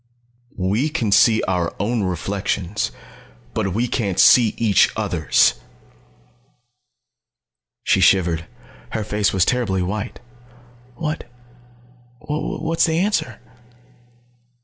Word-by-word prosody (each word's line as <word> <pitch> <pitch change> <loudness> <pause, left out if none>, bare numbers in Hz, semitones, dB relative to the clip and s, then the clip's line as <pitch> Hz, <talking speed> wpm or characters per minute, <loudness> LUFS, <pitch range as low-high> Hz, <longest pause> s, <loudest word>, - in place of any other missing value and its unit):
"We 95 -1 -1
we 155 - 0
can 120 -9 -2
see 110 +2 +4
our 90 -2 -1
own 110 +3 -1
reflections, 95 +1 -2 0.6
but 95 +2 -2
we 120 +3 0
can't 100 -7 -2
see 115 -4 +6
each 105 -4 +3
other's!" 95 -8 +2 2.2
She - - +2
shivered. 85 -4 +2 0.5
Her 110 - -2
face 105 0 0
was 95 -3 +2
terribly 110 -8 0
white. 100 +4 -4 0.8
"What 155 +2 -4 0.9
what 160 +3 -4
is - - +6
the 160 -1 0
answer?" 185 -3 -1
105 Hz, 105 wpm, -20 LUFS, 95-125 Hz, 2.2 s, see